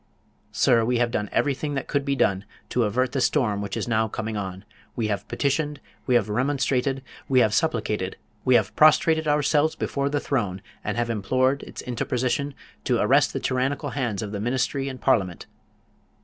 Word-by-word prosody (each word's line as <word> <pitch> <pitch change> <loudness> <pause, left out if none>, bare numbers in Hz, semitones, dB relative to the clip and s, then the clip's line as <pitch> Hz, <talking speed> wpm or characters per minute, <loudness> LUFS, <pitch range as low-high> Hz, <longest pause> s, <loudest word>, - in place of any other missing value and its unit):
Sir, 115 -1 +3
we 120 +2 +1
have 120 0 +1
done 105 -3 -2
everything 145 +1 0
that 135 - -3
could 145 -1 0
be 140 0 0
done, 100 -6 +1 0.3
to 120 -2 +1
avert 125 +5 0
the 135 -1 -1
storm 120 -6 +1
which 100 -1 -4
is - - -3
now 110 -1 +2
coming 110 0 -4
on. 95 -1 -5 0.3
We 110 -3 -1
have 100 0 -2
petitioned, 145 +1 -1 0.3
we 125 - +3
have 110 -4 +3
remonstrated, 135 +2 0 0.3
we 130 -2 +5
have 110 -2 +3
supplicated, 105 -12 0 0.3
we 130 -1 +4
have - - +2
prostrated 160 +1 +4
ourselves 150 +1 +2
before 140 0 -1
the 145 0 0
throne, 105 -10 -2 0.2
and 105 +2 -3
have 120 0 0
implored 130 +6 +1
its - - -9
interposition 125 +3 -1 0.3
to - - +2
arrest - - +3
the - - -3
tyrannical 130 +2 -1
hands 120 -8 -2
of 105 - -5
the 105 - -4
Ministry 130 +4 -1
and 130 -1 -7
Parliament. 95 -9 +1
125 Hz, 180 wpm, -25 LUFS, 110-140 Hz, 0.3 s, we